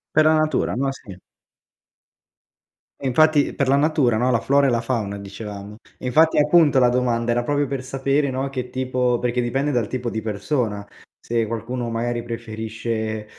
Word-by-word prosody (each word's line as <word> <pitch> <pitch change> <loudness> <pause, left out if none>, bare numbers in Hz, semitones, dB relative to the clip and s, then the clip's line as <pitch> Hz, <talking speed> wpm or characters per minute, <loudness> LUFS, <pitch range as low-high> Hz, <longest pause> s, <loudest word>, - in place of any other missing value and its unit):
Per 155 - +6
la 155 - +5
natura, 155 0 +1
no, 135 +3 0
sì. 100 -8 -11 1.8
E 135 - -2
infatti 155 +2 +3
per 140 -2 0
la 140 - +4
natura, 145 -6 +2
no, 125 +3 +1
la 115 -3 +2
flora 140 0 +3
e - - +3
la 120 -2 +1
fauna 115 -5 -2
dicevamo. 100 +1 -8 0.2
E - - -9
infatti 160 +6 +3
appunto, 150 -2 +5
la 125 -1 +5
domanda 120 -1 0
era 120 +1 +1
proprio 145 +2 0
per 135 -1 -4
sapere, 135 +2 0
no, 130 +1 -2
che 125 -2 -5
tipo 125 -1 0
perché 125 0 -1
dipende 135 +5 -1
dal 120 -6 0
tipo 125 0 -3
di 110 -1 -4
persona, 105 0 -2 0.3
se 115 -1 -1
qualcuno 115 +2 -4
magari 120 +1 -2
preferisce, 110 -1 -4
125 Hz, 175 wpm, -22 LUFS, 115-135 Hz, 1.8 s, Per